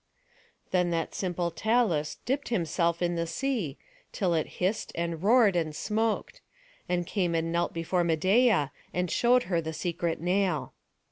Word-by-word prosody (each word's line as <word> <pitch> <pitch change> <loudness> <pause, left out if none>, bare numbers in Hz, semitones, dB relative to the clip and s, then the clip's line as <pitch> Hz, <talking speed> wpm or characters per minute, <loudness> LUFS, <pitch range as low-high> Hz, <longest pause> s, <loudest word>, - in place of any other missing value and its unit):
Then 180 -1 +2
that 165 -1 -2
simple 175 -2 -2
Talus 180 -7 +1
dipped 275 +4 -1
himself 170 -4 0
in 175 0 +1
the 170 0 -1
sea, 215 - -2 0.3
till 185 -4 0
it 160 -2 0
hissed, 190 +4 -1
and 170 -1 -2
roared, 215 -1 +5
and 160 -3 -1
smoked; 220 +3 -1 0.5
and 175 -1 0
came 175 -3 0
and 165 0 0
knelt 170 0 0
before 170 +2 0
Medeia, 185 - +3 0.2
and 180 -1 0
showed 245 +1 +4
her 175 -2 0
the 160 0 -5
secret 170 0 -2
nail. 180 -2 0
175 Hz, 150 wpm, -28 LUFS, 165-205 Hz, 0.5 s, roared